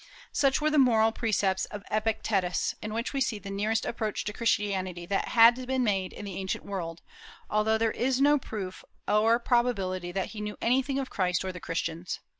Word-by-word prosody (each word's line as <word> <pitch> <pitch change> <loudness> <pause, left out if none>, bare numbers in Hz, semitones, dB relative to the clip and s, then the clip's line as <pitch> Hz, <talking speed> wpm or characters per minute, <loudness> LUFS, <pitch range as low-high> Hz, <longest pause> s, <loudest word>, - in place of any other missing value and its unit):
Such 275 -2 +2
were 305 0 +1
the 300 - +4
moral 225 -4 +5
precepts 205 -4 0
of 205 -1 -8
Epictetus, 215 -4 0
in 215 - -5
which 230 +5 -3
we 275 - -1
see 230 -4 0
the 200 0 -8
nearest 215 +3 0
approach 220 -2 -2
to 210 - -4
Christianity 195 -6 -1
that 195 +2 -1
had 240 +2 +5
been 260 -1 +1
made 195 -4 0
in 205 - -8
the 195 -2 -6
ancient 190 -1 -3
world, 175 -4 -5 0.5
although 215 +1 +2
there 225 0 +1
is 255 +3 0
no 290 +1 +5
proof 195 -7 -6 0.2
or 220 +2 +4
probability 200 -8 0
that 190 +1 -2
he 215 - -7
knew 210 0 -5
anything 265 +3 +1
of 270 -1 -3
Christ 180 -1 0
or 190 - -2
the 180 - -8
Christians. 165 +1 -3
215 Hz, 195 wpm, -28 LUFS, 190-235 Hz, 0.5 s, moral